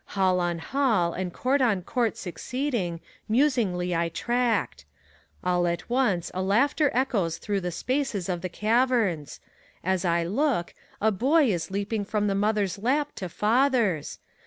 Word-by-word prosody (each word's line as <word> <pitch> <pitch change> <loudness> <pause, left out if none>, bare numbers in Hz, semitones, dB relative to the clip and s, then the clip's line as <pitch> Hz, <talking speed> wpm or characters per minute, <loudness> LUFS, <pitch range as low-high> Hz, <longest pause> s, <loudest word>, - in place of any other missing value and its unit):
Hall 185 -1 +3
on 175 -1 0
hall, 210 -4 +1
and 185 -1 -3
court 265 +8 0
on 210 -8 +2
court 235 +2 -1
succeeding, 195 - -3 0.3
musingly 215 - +1
I 170 0 0
tracked. 235 - -1 0.6
All 180 -1 +1
at 170 +7 -3
once 220 -10 +1
a 185 - -2
laughter 275 +10 +2
echoes 215 -10 0
through 205 -2 -2
the 180 - -2
spaces 255 - -2
of 175 -2 -2
the 185 - -3
caverns; 215 - +1 0.4
As 190 0 0
I 170 -1 +2
look, 210 - 0 0.3
a 220 +1 +3
Boy 265 - +3
is 165 -2 -3
leaping 205 +2 -2
from 210 +1 -1
the 200 - +1
mother'a 205 -1 0
lap 290 +5 +1
to 185 -5 -4
father's. 225 - +1
205 Hz, 150 wpm, -26 LUFS, 180-250 Hz, 0.6 s, Hall